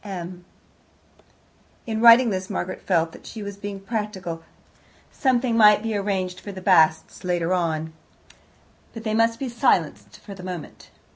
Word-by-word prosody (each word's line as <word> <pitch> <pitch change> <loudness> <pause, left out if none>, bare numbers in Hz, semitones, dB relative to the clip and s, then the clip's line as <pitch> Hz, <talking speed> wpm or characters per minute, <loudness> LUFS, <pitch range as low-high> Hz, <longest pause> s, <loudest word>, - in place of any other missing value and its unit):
M 180 -3 -7 1.4
In 220 -1 -3
writing 235 0 +7
this, 185 -1 -3
Margaret 185 - -4
felt 165 -3 +1
that - - -14
she 220 - -7
was 200 0 -6
being 200 -1 -6
practical. 195 -5 -4 0.7
Something 255 -3 +1
might 210 -1 +6
be 225 -1 -2
arranged 190 -3 -2
for 205 - -8
the 190 - -8
Basts 160 -4 +2
later 175 -1 0
on, 160 -3 -1 1.0
but 225 - -7
they 215 -1 -2
must 230 +1 +2
be 270 - -4
silenced 165 - 0
for 200 - -11
the 190 - -11
moment. 180 -3 -8
195 Hz, 150 wpm, -23 LUFS, 175-220 Hz, 1.4 s, writing